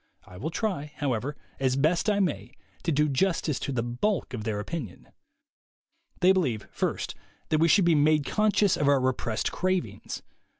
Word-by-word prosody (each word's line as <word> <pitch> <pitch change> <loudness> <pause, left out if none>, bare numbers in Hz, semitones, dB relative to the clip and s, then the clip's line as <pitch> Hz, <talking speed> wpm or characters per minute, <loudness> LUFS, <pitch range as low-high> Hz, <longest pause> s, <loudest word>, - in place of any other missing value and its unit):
I 90 - -13
will 140 +12 -3
try, 165 -6 -2
however, 135 0 -2 0.2
as 130 -1 +1
best 160 +8 +2
I 205 -1 +2
may, 130 - -1 0.3
to 170 - -1
do 150 +1 +3
justice 155 0 0
to - - -3
the 120 -3 -1
bulk 130 - -1
of 110 -4 -4
their 105 -2 -1
opinion. 120 - -6 1.1
They 180 +1 +6
believe, 135 - 0
first, - - -2 0.4
that 155 - +2
we 165 - +5
should 190 +2 +5
be 170 - +5
made 150 -1 +3
conscious 210 0 +2
of 145 - 0
our 140 -1 +5
repressed 125 -3 -1
cravings. 180 - -2
150 Hz, 170 wpm, -27 LUFS, 125-180 Hz, 1.1 s, They